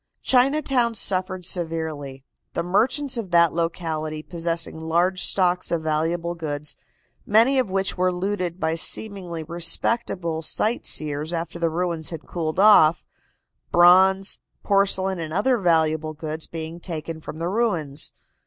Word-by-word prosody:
Chinatown 260 -2 +2
suffered 185 -2 +1
severely, 160 -6 -3 0.3
the 170 - -2
merchants 245 - 0
of 220 -5 -4
that 170 -1 +4
locality 160 -2 -3
possessing 165 -1 -3
large 175 +4 0
stocks 180 -1 +2
of 165 -2 -1
valuable 165 +2 -1
goods, 150 -3 -4 0.5
many 230 +6 +4
of 250 -6 0
which 195 0 -1
were 185 0 +2
looted 180 -1 -3
by 160 - 0
seemingly 175 -1 0
respectable 170 +1 -1
sightseers 155 -6 0
after 170 0 -4
the 165 -1 +1
ruins 170 -1 -2
had 165 -3 -7
cooled 160 -1 -3
off, 190 -6 +6 0.7
bronze, 190 +2 +5 0.2
porcelain 195 -2 +1
and 160 -1 -5
other 240 +6 +1
valuable 160 -3 +1
goods 155 0 -6
being 165 +1 -7
taken 165 -2 -6
from 155 - -8
the 165 +1 -3
ruins. 175 -9 -2
170 Hz, 130 wpm, -23 LUFS, 160-190 Hz, 0.7 s, off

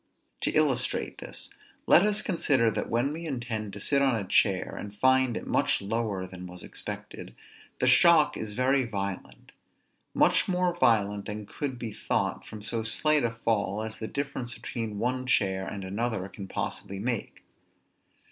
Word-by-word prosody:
To - - 0
illustrate 135 -5 0
this: - - -9 0.3
let - - +7
us 210 +1 +1
consider 135 - +2
that - - -3
when 125 +5 +1
we 165 +1 -6
intend 120 -6 -3
to 100 - -7
sit 140 +6 +2
on 135 -3 +3
a 110 - -2
chair, 95 0 +2
and 105 0 -7
find 130 +1 +3
it - - -6
much - - +1
lower 105 -2 -2
than 90 -1 -9
was 90 0 -9
expected, - - -7 0.4
the - - 0
shock 150 +4 +6
is 110 -1 -5
very 130 +2 +2
violent; 100 -5 -5 0.6
much - - +4
more 180 -1 +1
violent 105 -9 +2
than 105 0 -5
could 130 +3 -4
be 115 -3 -5
thought 100 -2 -2
from 105 -2 -9
so 115 +1 -2
slight 150 +6 +5
a 120 - +2
fall 110 -2 -1
as 110 0 -5
the 110 - -4
difference 135 -4 -4
between 115 -2 -5
one 130 +3 -1
chair 95 -6 +1
and 100 -1 -5
another 100 +1 -2
can 100 -1 -9
possibly 100 +1 -4
make. 115 +2 -3
115 Hz, 165 wpm, -28 LUFS, 105-130 Hz, 0.6 s, let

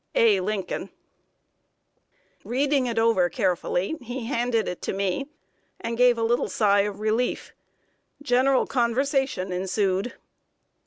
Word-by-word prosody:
A. 215 -4 +5
LINCOLN. 195 +1 -3 1.5
Reading 270 +1 +1
it 230 -1 -3
over 225 -6 +3
carefully, 190 - -1
he 245 0 -6
handed 235 -2 0
it 180 - -5
to - - -3
me, 195 +7 -1 0.5
and 230 - -3
gave 245 0 +4
a 230 - -1
little 235 +2 +1
sigh 205 -2 +3
of 200 0 -1
relief. 220 +3 -1 0.7
General 260 0 +3
conversation 260 -4 0
ensued. 190 +3 -1
230 Hz, 115 wpm, -25 LUFS, 200-250 Hz, 1.5 s, A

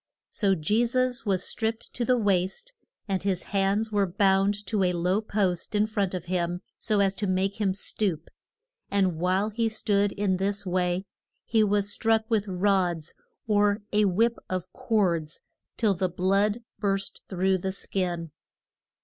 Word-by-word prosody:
So 195 -3 +2
Je 205 +9 +1
sus 250 0 0
was 190 -2 +1
stripped 225 0 -2
to 245 - -2
the 250 +1 +3
waist, 205 - 0 0.3
and 195 -2 -1
his 190 -2 -1
hands 200 +3 +1
were 200 -2 +2
bound 195 +2 +2
to 210 -3 0
a 180 -1 +2
low 180 +4 +1
post 200 -3 -1
in 210 0 +4
front 200 -3 -1
of 180 -1 -5
him 175 0 -1 0.2
so 210 -2 +1
as 195 -1 +2
to 200 +1 -3
make 190 +3 0
him 190 -2 +1
stoop, 190 -5 -2 0.6
and 190 -5 +1
while 190 +4 +1
he 225 +1 0
stood 205 -2 +1
in 195 -2 0
this 200 +2 -1
way 180 +1 0 0.4
he 220 -2 +3
was 205 0 +1
struck 225 -1 +2
with 215 -2 +1
rods, 180 -4 0 0.3
or 205 -1 +2
a 210 0 +4
whip 225 +5 +2
of 185 0 -4
cords, 170 -8 0 0.4
till 215 -4 +3
the 185 0 -1
blood 200 +5 +1 0.2
burst 195 -2 -1
through 190 0 +1
the 190 +2 -2
skin. 175 -4 -2
195 Hz, 160 wpm, -27 LUFS, 185-210 Hz, 0.6 s, in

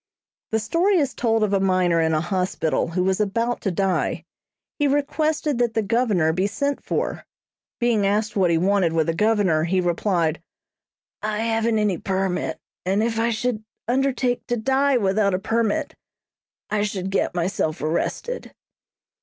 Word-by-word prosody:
The 220 - +1
story 345 - +2
is 285 -5 +1
told 225 -2 +1
of 205 -1 0
a 195 - +3
miner 185 -3 +2
in 160 0 +2
a 155 - +1
hospital 180 -3 -1
who 175 +2 -1
was 190 +2 +1
about 230 +4 -1
to 195 - 0
die. 190 +1 -1 0.5
He 290 - +3
requested 295 0 0
that 240 -2 +1
the 220 - +1
Governor 205 -8 +2
be 185 +4 +1
sent 280 +6 -2
for. - - -2 0.6
Being 230 -5 +2
asked 210 +2 0
what 190 -3 +3
he 165 - +3
wanted 185 -1 +2
with 160 -1 +2
the 165 - 0
Governor, 195 -5 +2
he 185 +2 +1
replied: 175 -2 0 0.8
"I 215 0 -2
haven't 225 0 +1
any 210 -5 +1
permit, 190 -1 -1 0.3
and 195 +4 +1
if 225 -1 -1
I 230 +1 +2
should 230 -1 -2 0.2
undertake 255 -1 0
to 240 - 0
die 270 +3 +2
without 200 -2 +2
a - - +1
permit, 230 +9 0 0.8
I 210 -1 +1
should 195 -2 -2
get 190 - 0
myself 170 -3 -1
arrested." 170 - -3
210 Hz, 160 wpm, -23 LUFS, 185-235 Hz, 0.8 s, a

